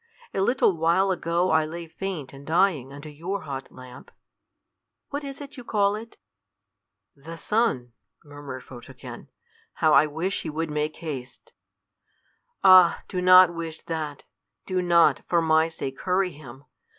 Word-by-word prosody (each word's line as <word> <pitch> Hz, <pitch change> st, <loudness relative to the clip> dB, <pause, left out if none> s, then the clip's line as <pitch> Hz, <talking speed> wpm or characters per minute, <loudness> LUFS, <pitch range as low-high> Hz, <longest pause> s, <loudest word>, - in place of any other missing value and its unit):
A 195 Hz, -, -1 dB
little 220 Hz, -3 st, +2 dB
while 170 Hz, +4 st, +2 dB
ago 175 Hz, 0 st, 0 dB
I 160 Hz, 0 st, +4 dB
lay 165 Hz, +2 st, -6 dB
faint 165 Hz, -4 st, -6 dB
and 135 Hz, +1 st, -12 dB
dying 160 Hz, -4 st, +1 dB
under 145 Hz, +2 st, -10 dB
your 170 Hz, +7 st, -5 dB
hot 135 Hz, -3 st, -7 dB
lamp. 125 Hz, -1 st, -13 dB, 1.0 s
What 285 Hz, +1 st, -4 dB
is 275 Hz, -1 st, -7 dB
it 285 Hz, 0 st, -10 dB
you 250 Hz, -, -8 dB
call 205 Hz, -3 st, +1 dB
it?" 225 Hz, +2 st, -8 dB, 1.0 s
"The 165 Hz, +4 st, -10 dB
sun," 165 Hz, -, 0 dB, 0.3 s
murmured 145 Hz, -3 st, -9 dB
Photogen: 125 Hz, +1 st, -11 dB, 0.5 s
"how 155 Hz, -2 st, +2 dB
I 145 Hz, +2 st, +6 dB
wish 165 Hz, +6 st, -3 dB
he 160 Hz, -, -5 dB
would 160 Hz, +1 st, -3 dB
make 150 Hz, +1 st, -2 dB
haste!" 135 Hz, -6 st, -8 dB, 1.1 s
"Ah! 185 Hz, -3 st, +7 dB
do 180 Hz, -, -3 dB
not 185 Hz, -1 st, +7 dB
wish 165 Hz, -1 st, -7 dB
that. 155 Hz, -3 st, -5 dB, 0.4 s
Do 185 Hz, -1 st, -1 dB
not, 170 Hz, -1 st, +4 dB
for 170 Hz, -, +3 dB
my 160 Hz, 0 st, +3 dB
sake, 135 Hz, -4 st, -7 dB
hurry 185 Hz, 0 st, +1 dB
him. 140 Hz, -2 st, -13 dB
165 Hz, 150 wpm, -25 LUFS, 145-185 Hz, 1.1 s, Ah